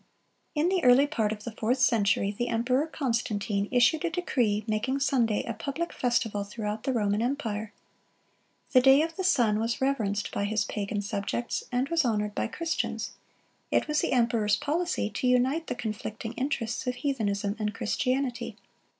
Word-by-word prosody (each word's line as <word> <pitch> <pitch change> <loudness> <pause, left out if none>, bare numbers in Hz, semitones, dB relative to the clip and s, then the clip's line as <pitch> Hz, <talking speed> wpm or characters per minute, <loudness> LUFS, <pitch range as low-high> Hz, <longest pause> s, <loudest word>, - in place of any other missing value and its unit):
In 300 +3 +2
the 375 -1 +1
early 250 +2 +7
part 230 -8 0
of 210 -1 -5
the 235 - -5
fourth 225 +3 0
century, 205 -6 +3
the 240 +3 -1
emperor 245 +5 +1
Constantine 220 -8 -1
issued 260 +6 +4
a 345 - +1
decree 245 - 0
making 225 +5 -1
Sunday 245 -6 +2
a 230 - -4
public 280 +9 -4
festival 225 -4 0
throughout 210 +1 -5
the 265 - +1
Roman 210 -3 +1
empire.(77) 225 -3 -7
The 255 - +7
day 270 +3 +6
of 330 0 -4
the 380 - -3
sun 235 - +3
was 230 +1 -1
reverenced 220 -7 0
by 200 - -1
his 215 0 0
pagan 205 0 -3
subjects, 200 +4 -3
and 250 +2 +1
was 335 -1 +2
honored 210 -4 0
by - - -1
Christians; 330 +8 -2 0.6
it - - +1
was 300 0 +1
the - - -1
emperor's 230 -4 +2
policy 315 - -1
to 255 - -1
unite 260 +6 +2
the - - -2
conflicting 220 0 -5
interests 255 -3 -2
of 250 - 0
heathenism 205 -7 -1
and 210 -1 -1
Christianity. 250 -2 -1
235 Hz, 165 wpm, -28 LUFS, 210-270 Hz, 0.6 s, early